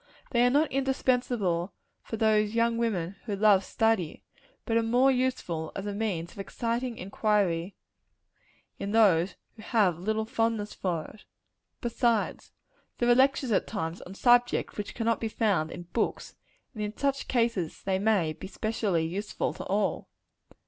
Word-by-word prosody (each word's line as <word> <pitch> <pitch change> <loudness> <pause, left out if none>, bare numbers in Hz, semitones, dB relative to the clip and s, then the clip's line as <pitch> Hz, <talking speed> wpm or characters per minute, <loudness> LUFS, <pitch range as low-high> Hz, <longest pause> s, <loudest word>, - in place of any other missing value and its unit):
They 240 -1 +3
are 245 - +5
not 290 +4 +2
indispensable 245 -9 0 0.4
to 225 - -3
those 215 0 +2
young 230 0 +2
women 195 -6 -1
who 210 -4 -2
love 200 -1 +5
study; 225 -6 0 0.4
but 225 - 0
are 230 - +4
more 245 +4 +4
useful 250 -11 -1
as 195 - -4
a 205 - -3
means 190 -6 -2
of - - -14
exciting 235 +4 -3
inquiry 195 -2 0 1.0
in 200 +1 -3
those 195 -5 +4 0.2
who 220 - -12
have 210 -5 +2
very 175 +3 -11
little 220 0 0
fondness 225 -2 -1
for 170 -4 -2
it. 215 - -14 0.6
Besides, 235 -2 0 0.5
there 240 - +1
are - - +8
lectures, 265 0 +3
at 200 - +2
times, 170 -5 -4
on 190 - -10
subjects 245 +2 +3
which 205 - -5
cannot 230 -1 0
be 225 - -2
found 200 -9 +1
in 175 - -7
books; 230 - -1 0.4
and 215 - -6
in 210 0 -4
such 275 -1 -1
cases 230 -9 0
they 190 -1 0
may 195 -7 +2
be 165 +5 -9
specially 205 -5 -1
useful 195 +6 -3
to - - -7
all. 200 +1 -1
215 Hz, 160 wpm, -28 LUFS, 190-235 Hz, 1.0 s, are